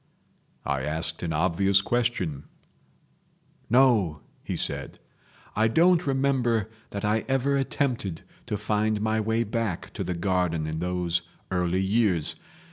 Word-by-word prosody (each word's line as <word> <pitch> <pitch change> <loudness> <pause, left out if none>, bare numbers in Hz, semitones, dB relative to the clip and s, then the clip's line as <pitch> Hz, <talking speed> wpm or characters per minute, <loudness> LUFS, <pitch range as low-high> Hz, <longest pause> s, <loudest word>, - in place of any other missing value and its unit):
I 70 -1 0
asked 80 +3 -3
an 85 - -2
obvious 95 +4 +3
question. 95 - -1 1.2
"No," 110 - +4 0.2
he - - -3
said. - - -3 0.6
"I 110 +2 +4
don't 170 +6 +4
remember 130 -5 +1 0.2
that 100 0 -4
I 105 +1 +1
ever 135 +1 +1
attempted 130 - -1 0.2
to 105 - -1
find 105 +1 0
my 110 +1 +1
way 110 +2 +1
back 110 -4 -3
to - - -3
the 90 - -3
garden 85 -3 0
in 80 0 -3
those 90 0 0 0.3
early 90 +1 +1
years. 95 -6 +2
105 Hz, 125 wpm, -26 LUFS, 85-115 Hz, 1.2 s, No